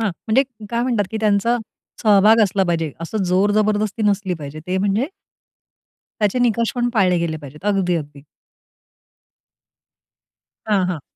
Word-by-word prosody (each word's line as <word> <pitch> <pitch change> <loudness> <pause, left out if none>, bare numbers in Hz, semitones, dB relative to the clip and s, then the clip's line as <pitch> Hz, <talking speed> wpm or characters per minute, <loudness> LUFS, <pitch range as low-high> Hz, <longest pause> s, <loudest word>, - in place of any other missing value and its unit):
हां, 220 -3 0 0.2
म्हणजे 225 +5 +4 0.3
काय 235 0 0
म्हणतात 235 -5 +1
कि 220 - -3
त्यांचा 215 +3 +2 0.5
सहभाग 215 +1 +5
असला 195 -1 +1
पाहिजे. 165 -3 -1
असं 195 +5 -3
जोर 185 +3 +2
जबरदस्ती 215 0 0
नसली 200 -3 +1
पाहिजे 150 -1 -8
ते 185 +1 -1
म्हणजे, 205 +6 +1 1.1
त्याचे 210 +4 +1
निकष 235 -2 +1
पण 245 0 0
पाळले 185 -5 +3
गेले 165 -2 -2
पाहिजेत. 150 +4 -12
अगदी, 190 -4 +1
अगदी. 145 -2 -7 2.4
हां, 200 -3 +2
हां. 160 -6 -4
200 Hz, 140 wpm, -20 LUFS, 175-220 Hz, 2.4 s, सहभाग